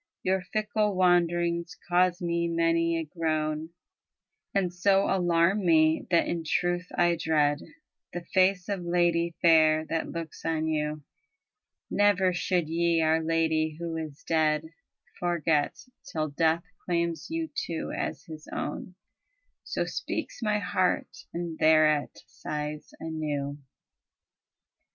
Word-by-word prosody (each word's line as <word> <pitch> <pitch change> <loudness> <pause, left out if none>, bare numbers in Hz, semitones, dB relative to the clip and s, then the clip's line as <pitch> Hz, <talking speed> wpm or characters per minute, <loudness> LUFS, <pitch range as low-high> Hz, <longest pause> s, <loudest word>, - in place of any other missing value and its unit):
Your 190 0 +1
fickle 210 +2 -1
wanderings 175 -1 +2
cause 180 +1 +2
me 170 0 0
many 165 0 +1
a 165 - -1
groan 155 -1 -2 0.8
And 185 -3 0
so 195 +2 +3
alarm 180 +2 +2
me, 160 -2 +3
that 170 -2 +3
in 170 -1 -2
truth 175 +3 0
I 175 0 +4
dread 150 -3 +2 0.5
The 175 -1 -6
face 185 -1 +3
of 200 -3 -3
lady 170 -1 +1
fair 155 -2 +5
that 165 0 -1
looks 165 -2 -7
on 160 -1 0
you. 150 -1 -2 0.9
Never 200 -3 +3
should 175 -2 0
ye 170 +1 +1
our 160 +1 +3
Lady 160 -1 +1
who 170 -1 -4
is 155 -1 -6
dead 155 -1 +1 0.5
Forget, 165 -4 0 0.3
till 155 -1 -1
death 160 +3 +1 0.2
claims 170 -2 -1
you 325 0 -3
too 170 - -3
as - - -3
his 155 -1 -10
own." 180 +4 -5 0.7
So - - -2
speaks - - -4
my 210 -2 +1
heart, 185 -2 -1
and 170 -2 -5
thereat 155 -2 +3
sighs 150 0 -6
anew. 150 -3 -3
170 Hz, 125 wpm, -28 LUFS, 155-175 Hz, 0.9 s, fair